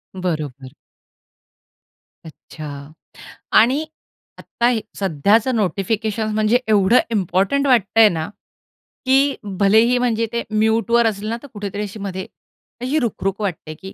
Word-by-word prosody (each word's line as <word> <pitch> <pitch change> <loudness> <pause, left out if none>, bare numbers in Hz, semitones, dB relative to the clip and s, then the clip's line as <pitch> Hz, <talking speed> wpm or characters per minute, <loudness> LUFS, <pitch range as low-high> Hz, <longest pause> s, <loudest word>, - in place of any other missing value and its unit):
बरोबर. 155 -8 -4 1.6
अच्छा. 150 -2 -10 0.6
आणि 260 +8 +4 0.5
आत्ता 240 - -2
हे 235 -3 0 0.2
सध्याचं 200 - +2
नोटिफिकेशन्स 215 +2 -1
म्हणजे 215 +3 +2
एवढं 210 +2 +4
इम्पोर्टंट 200 +7 +1
वाटतंय 225 -3 +5
ना, 160 -3 -3 0.8
की 270 +2 +3 0.2
भलेही 220 +5 +4
म्हणजे 230 -2 0
ते 235 - -1
म्यूटवर 225 +2 +2
असलं 215 0 -3
ना 230 - -2
तर - - -9
कुठेतरी 205 -1 -5
अशी 210 +1 -7
मध्ये 190 -2 -5 0.6
अशी 265 +5 0
रुखरुख 205 -5 -2
वाटते, 170 -5 -4
की 190 0 -9
215 Hz, 115 wpm, -20 LUFS, 190-235 Hz, 1.6 s, वाटतंय